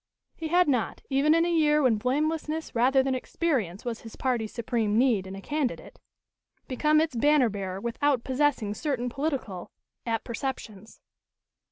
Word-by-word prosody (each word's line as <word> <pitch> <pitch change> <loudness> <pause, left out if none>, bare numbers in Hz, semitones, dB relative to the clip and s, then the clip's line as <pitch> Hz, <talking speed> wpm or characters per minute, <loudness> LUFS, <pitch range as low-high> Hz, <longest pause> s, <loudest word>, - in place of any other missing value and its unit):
He 325 - -5
had 355 +2 +3
not, 250 -6 -1
even 285 +4 +4
in 330 0 +3
a 345 - 0
year 300 -2 +3
when 240 -4 +3
blamelessness 310 +5 -1
rather 260 +3 +3
than 265 0 0
experience 250 - -2
was 235 -2 -4
his 225 - -11
party's 240 -5 -1
supreme 225 -3 -1
need 230 -7 +2
in 190 - -7
a 195 - -8
candidate, 300 - -3 0.7
become 300 +4 +2
its 315 -4 0
banner 285 0 +4
bearer 195 -2 -4
without 240 +3 0
possessing 260 -6 0
certain 250 0 -2
political 265 - -3 0.4
apperceptions. 225 -2 -5
260 Hz, 150 wpm, -27 LUFS, 225-300 Hz, 0.7 s, even